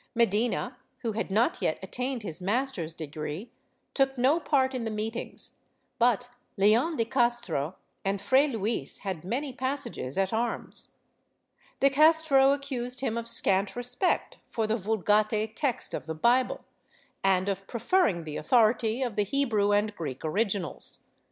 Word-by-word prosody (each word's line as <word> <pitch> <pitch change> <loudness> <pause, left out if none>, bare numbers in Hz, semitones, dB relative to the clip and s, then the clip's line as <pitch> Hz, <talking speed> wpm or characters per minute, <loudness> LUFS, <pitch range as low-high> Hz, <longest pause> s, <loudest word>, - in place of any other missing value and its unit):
Medina, 235 +3 +1 0.3
who 230 - 0
had 220 0 -3
not 220 +5 +1
yet 155 - 0
attained 250 +4 -3
his 170 -3 -5
master's 205 -4 0
degree, 155 +6 -6 0.4
took 270 -1 +1
no 270 +7 +3
part 270 -5 +1
in 255 -2 -3
the 225 - -2
meetings, 220 +2 -5 0.5
but 245 +1 +2 0.3
Leon 225 - +3
de 230 - 0
Castro 235 - 0 0.3
and 195 +1 -1
Fray 265 +8 +3
Luis 225 -4 -2
had 190 -6 -4
many 255 +8 -3
passages 260 - -2
at 195 +1 +1
arms. 230 +1 -2 0.9
De 275 0 +5
Castro 305 -2 +5
accused 260 -3 -3
him 230 -4 -1
of 235 0 -3
scant 195 -3 +4
respect 245 +9 -1
for 225 - -2
the 215 +1 0
Vulgate 215 +1 +1
text 255 -4 0
of - - -5
the 160 - -4
Bible, 240 +10 +1 0.6
and 190 -1 +2
of 195 -1 -3
preferring 235 - +1
the 155 -1 -6
authority 225 +5 +2
of 240 -5 -3
the 210 - +2
Hebrew 215 -3 +1
and 205 +1 +1
Greek 145 -4 -6
originals. 195 -1 0
225 Hz, 145 wpm, -28 LUFS, 195-255 Hz, 0.9 s, De